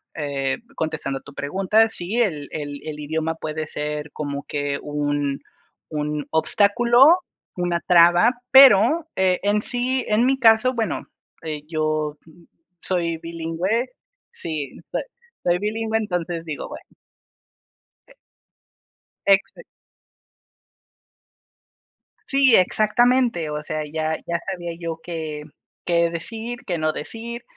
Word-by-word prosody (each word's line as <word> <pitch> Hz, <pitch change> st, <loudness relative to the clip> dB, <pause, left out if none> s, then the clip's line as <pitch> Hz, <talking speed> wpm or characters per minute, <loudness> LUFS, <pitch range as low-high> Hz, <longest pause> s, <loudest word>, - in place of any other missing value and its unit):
eh, 140 Hz, -3 st, -2 dB, 0.2 s
contestando 155 Hz, -4 st, -3 dB
a -, -, -25 dB
tu 140 Hz, -, -14 dB
pregunta, 195 Hz, +10 st, +1 dB
sí, 190 Hz, 0 st, -3 dB
el 155 Hz, -10 st, -1 dB
el 145 Hz, -2 st, -6 dB
el 150 Hz, -1 st, -6 dB
idioma 160 Hz, +2 st, -2 dB
puede 155 Hz, -1 st, -5 dB
ser 150 Hz, 0 st, -4 dB
como 145 Hz, -1 st, -5 dB
que 145 Hz, -1 st, -2 dB
un 145 Hz, -1 st, -2 dB, 0.5 s
un 150 Hz, -1 st, -3 dB
obstáculo, 235 Hz, -, +4 dB, 0.5 s
una 175 Hz, -1 st, -1 dB
traba. 175 Hz, +5 st, +6 dB, 0.2 s
Pero, 265 Hz, -, +7 dB
eh, 185 Hz, -1 st, +2 dB
en 205 Hz, +1 st, +2 dB
sí 250 Hz, +2 st, 0 dB
en 215 Hz, +3 st, +2 dB
mi 265 Hz, +1 st, +2 dB
caso, 230 Hz, +1 st, +5 dB
bueno, 225 Hz, -7 st, -3 dB, 0.4 s
eh, 155 Hz, -2 st, -5 dB
yo 155 Hz, -2 st, -2 dB, 0.6 s
soy 170 Hz, -3 st, -1 dB
bilingüe 170 Hz, +9 st, -3 dB, 0.4 s
sí, 150 Hz, -5 st, -5 dB
soy -, -, -1 dB, 0.4 s
soy 175 Hz, 0 st, +1 dB
bilingüe, 220 Hz, +2 st, -1 dB
entonces 175 Hz, -4 st, -3 dB
digo, 155 Hz, -3 st, -6 dB
bueno. -, -, -9 dB, 1.2 s
Eh -, -, -18 dB, 1.1 s
Exac 195 Hz, -, +2 dB, 2.7 s
Si, 270 Hz, -3 st, +9 dB
exactamente, 215 Hz, -2 st, +2 dB
o 150 Hz, -, -3 dB
sea, 155 Hz, 0 st, -4 dB
ya 160 Hz, 0 st, -1 dB
ya 170 Hz, 0 st, -1 dB
sabía 175 Hz, -2 st, -5 dB
yo 165 Hz, -1 st, -5 dB
qué 155 Hz, -3 st, -6 dB, 0.4 s
qué 170 Hz, -1 st, +1 dB
decir, 225 Hz, +8 st, -6 dB
qué 175 Hz, -, -1 dB
no 155 Hz, -1 st, 0 dB
decir. 235 Hz, +8 st, -6 dB
170 Hz, 120 wpm, -22 LUFS, 155-220 Hz, 2.7 s, Si